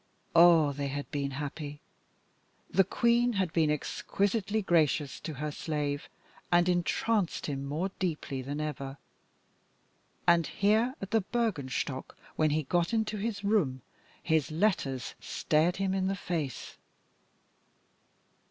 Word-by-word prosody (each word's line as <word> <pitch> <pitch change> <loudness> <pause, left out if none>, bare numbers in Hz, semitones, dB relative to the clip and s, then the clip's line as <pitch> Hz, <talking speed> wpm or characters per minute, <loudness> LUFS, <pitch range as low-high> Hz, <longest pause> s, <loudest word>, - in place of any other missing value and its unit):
Ah! 165 -3 +7
they 140 0 -3
had 140 +1 -5
been 140 -1 -1
happy. 145 +1 -5 0.9
The 195 - +5
Queen 235 +5 +2
had 190 -5 0
been 160 -2 +3
exquisitely 200 +7 -1
gracious 155 -5 +2
to 155 - -6
her 150 +3 -3
slave, 145 -1 -3 0.4
and 175 0 +5
entranced 180 +2 +1
him 140 -2 -3
more 155 +7 -2
deeply 155 -7 -2
than 140 +3 -4
ever. 140 -2 -4 1.3
And 170 -2 +4
here 220 +6 +2
at 195 - -6
the 225 0 +3
Bürgenstock, 145 - -2 0.2
when 155 -1 +3
he 155 +1 +1
got 170 +7 +1
into 215 -1 0
his 205 0 -3
room, 170 - +1 0.4
his 160 -4 +2
letters 155 -7 0
stared 160 +4 +1
him 195 -1 0
in 190 -1 0
the 195 - 0
face. 165 -8 -4
165 Hz, 125 wpm, -30 LUFS, 145-195 Hz, 1.3 s, Ah